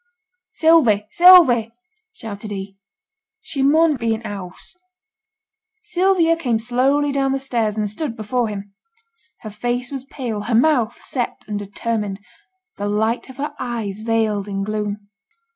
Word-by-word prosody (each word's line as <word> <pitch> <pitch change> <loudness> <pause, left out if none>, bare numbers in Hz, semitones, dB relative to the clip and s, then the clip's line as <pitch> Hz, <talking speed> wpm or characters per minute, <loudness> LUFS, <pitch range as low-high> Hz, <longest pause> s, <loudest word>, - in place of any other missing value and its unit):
'Sylvie, 260 -11 +4
Sylvie!' 330 -11 +7 0.4
shouted 215 - -8
he; 195 -1 -6 0.6
'she 275 - -5
mun 305 +2 +4
be 230 -2 0
i' - - -4
t' 230 - -14
house.' 190 -3 -9 1.1
Sylvia 360 -2 +2
came 250 -9 0
slowly 260 +5 +1
down 270 -1 0
the - - +1
stairs, 230 -5 -1
and 210 -1 0
stood 230 +4 -4
before 230 +2 -1
him. 200 -1 -7 0.7
Her 215 - -8
face 245 +4 -3
was 270 -2 -5
pale, 240 -7 -5
her 225 +2 -1
mouth 240 -3 +3
set 245 -3 -4
and 210 -1 -3
determined; 205 0 -3 0.6
the 205 0 -2
light 220 +5 -1
of 260 - -12
her 290 +2 -4
eyes 225 -5 -4
veiled 220 -2 0
in 195 -1 -3
gloom. 210 -1 -4
230 Hz, 145 wpm, -20 LUFS, 210-270 Hz, 1.1 s, Sylvie